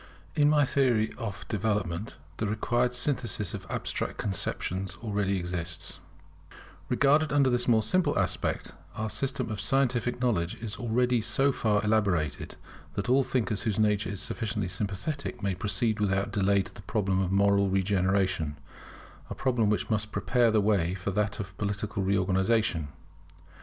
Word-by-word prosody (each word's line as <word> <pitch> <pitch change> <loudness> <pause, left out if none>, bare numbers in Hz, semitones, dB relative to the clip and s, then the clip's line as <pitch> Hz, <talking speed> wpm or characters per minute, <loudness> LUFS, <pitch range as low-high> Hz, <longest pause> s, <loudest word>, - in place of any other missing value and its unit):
[In 145 -1 +4
my 150 -1 +4
Theory 125 -6 +2
of 105 -4 -5
Development, 105 -2 -2 0.2
the 110 - -1
required 120 +4 0
Synthesis 120 - -1
of 95 -2 -7
Abstract - - -3
conceptions 95 -1 -2
already 100 -3 0
exists] 85 -1 -3 0.9
Regarded 145 +3 +3
under 140 -2 +4
this 125 0 0
more 110 -3 +4
simple 160 - +1
aspect, - - -1 0.2
our 110 0 -2
system 130 -4 -2
of 105 -1 -3
scientific 125 0 +1
knowledge 100 -9 0
is 110 -1 -6
already 120 +1 +1
so 120 +5 +2
far 105 -5 +1
elaborated, 100 -9 0 0.4
that 100 +4 -2
all 135 +2 +5
thinkers 110 -5 -1
whose 110 -4 -1
nature 105 -1 +2
is 100 - -4
sufficiently 105 -5 -2
sympathetic 100 - -4
may 100 -1 +1
proceed 110 +3 -1
without 100 -1 0
delay 100 -1 +2
to - - -12
the - - -11
problem 95 -4 0
of 95 -1 0
moral 100 0 +3
regeneration; 95 -4 +1 0.7
a - - -5
problem 120 -5 +1
which 105 +2 0
must 105 -1 0
prepare 120 -2 +2
the 110 -1 +3
way 95 -4 +2
for 95 +1 -3
that 105 +1 -1
of 95 -2 -6
political 100 0 -2
reorganization. 95 -2 +1
105 Hz, 150 wpm, -28 LUFS, 95-120 Hz, 0.9 s, all